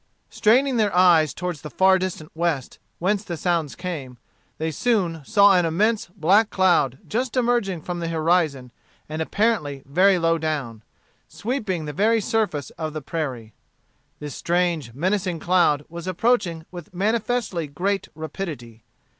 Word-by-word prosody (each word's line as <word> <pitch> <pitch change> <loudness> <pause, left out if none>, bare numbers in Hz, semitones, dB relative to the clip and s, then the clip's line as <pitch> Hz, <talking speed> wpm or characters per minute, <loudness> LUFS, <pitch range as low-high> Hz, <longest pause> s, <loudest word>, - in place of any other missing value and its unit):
Straining 240 +4 +3
their 210 -2 +2
eyes 170 -5 +5
toward 180 +2 -4
the 150 - -9
far 190 +4 +4
distant 180 -4 -5
west, 160 -5 -2 0.2
whence 195 +3 0
the 175 -5 -5
sounds 170 -4 -1
came, 155 -9 -6 0.4
they 160 +1 -2
soon 180 -4 0
saw 200 +4 +5
an 180 - +4
immense 205 +7 +1
black 190 +5 +3
cloud 175 -9 +2
just 245 +2 -2
emerging 235 -9 +1
from 175 -1 -4
the 170 - -3
horizon 160 -6 0 0.4
and 155 +1 -4
apparently 160 -8 0
very 185 +7 +4
low 165 -1 +1
down, 140 -8 -3 0.5
sweeping 210 - -3
the 150 - -5
very 220 +7 +3
surface 200 - -1
of 155 -2 -3
the 155 - -4
prairie. 130 -9 -4 0.6
This 150 -2 -7
strange, 170 -8 -1
menacing 185 +3 0
cloud 165 -5 +2
was 170 +2 -8
approaching 185 -4 0
with 175 -1 -10
manifestly 215 -3 -1
great 195 +8 -2
rapidity. 150 - -7
175 Hz, 145 wpm, -23 LUFS, 155-200 Hz, 0.6 s, eyes